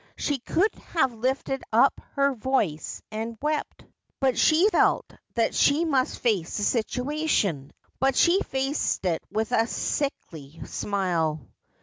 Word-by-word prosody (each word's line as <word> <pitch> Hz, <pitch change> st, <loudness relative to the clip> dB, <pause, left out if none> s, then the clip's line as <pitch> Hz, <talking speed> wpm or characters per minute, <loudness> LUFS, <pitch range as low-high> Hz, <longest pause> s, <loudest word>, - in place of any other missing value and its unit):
She 290 Hz, -2 st, -1 dB
could 370 Hz, -, +1 dB, 0.2 s
have 265 Hz, -7 st, +3 dB
lifted 260 Hz, +3 st, -2 dB
up 240 Hz, +5 st, +4 dB
her 280 Hz, 0 st, +2 dB
voice 215 Hz, -, -2 dB
and 225 Hz, +1 st, -4 dB
wept; 300 Hz, +1 st, -3 dB, 0.3 s
but 265 Hz, -2 st, +2 dB
she 330 Hz, +5 st, +4 dB
felt -, -, +3 dB, 0.3 s
that 230 Hz, -2 st, +1 dB
she 295 Hz, +4 st, +3 dB
must 270 Hz, -5 st, 0 dB
face 205 Hz, -9 st, 0 dB
the 205 Hz, -, -2 dB
situation, 245 Hz, -, 0 dB, 0.3 s
and 270 Hz, 0 st, +3 dB
she 350 Hz, +7 st, +4 dB
faced 270 Hz, -, -1 dB
it 170 Hz, -3 st, 0 dB
with 220 Hz, 0 st, -1 dB
a 225 Hz, 0 st, +2 dB
sickly 165 Hz, -, -4 dB
smile. 165 Hz, -8 st, -1 dB
250 Hz, 130 wpm, -26 LUFS, 200-280 Hz, 0.3 s, up